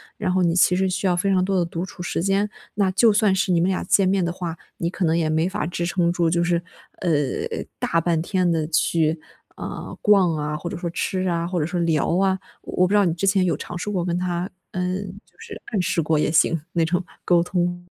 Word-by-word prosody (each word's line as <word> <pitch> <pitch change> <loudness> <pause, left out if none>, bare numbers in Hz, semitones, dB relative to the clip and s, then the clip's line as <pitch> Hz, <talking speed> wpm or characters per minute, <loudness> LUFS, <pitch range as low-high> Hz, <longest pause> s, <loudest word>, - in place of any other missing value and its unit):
然 185 -3 -1
后 185 - +2
你 170 -1 +2
其 180 0 +4
实 190 0 +2
需 185 +2 -2
要 180 -2 +2
非 195 +3 +1
常 185 -1 +3
多 195 0 0
的 170 - +1
独 170 +1 -4
处 185 -1 -8
时 175 -1 -2
间。 200 +2 +1 0.3
那 200 -2 +2
就 205 +4 +5
算 205 -2 +3
是 190 0 +1
你 170 - +3
们 175 - +2
俩 190 - -1
见 190 +1 +3
面 190 0 +2
的 170 - -1
话， 175 -2 -5 0.2
你 170 - -1
可 185 - -4
能 165 0 +2
也 160 -2 +1
没 160 +3 +1
法 190 -5 -2
支 175 0 -3
撑 175 -1 +1
住， 170 -2 +1
就 170 +1 +1
是， 170 -1 +1 0.4
呃， 180 -3 +1 0.7
大 165 - +1
半 165 -1 +1
天 180 0 0
地 160 -2 +1
去， 160 0 +1 0.4
啊， - - -6
逛 195 -5 +4
啊， 150 0 -2
或 160 +3 -5
者 - - -5
说 175 0 -3
吃 185 +2 -1
啊， 170 -1 0
或 175 0 -2
者 150 - 0
说 175 - -3
聊 165 0 +1
啊。 190 0 +2 0.2
我 180 0 +1
不 200 - -2
知 - - +5
道 205 - +5
你 170 -4 +1
之 195 - -1
前 190 -1 +3
有 175 - +1
尝 - - -6
试 180 - -4
过 180 -4 -1
跟 175 -1 -1
他， 180 0 -2 0.2
嗯， 185 +2 -2 0.2
就 - - -32
是 455 -1 -9
暗 200 - +2
示 170 - 0
过 155 0 +1
也 150 - +1
行， 165 0 +3
那 165 -1 +1
种 180 +3 0 0.2
沟 175 -1 +4
通？ 175 0 -2
175 Hz, 270 characters per minute, -23 LUFS, 170-190 Hz, 0.7 s, 就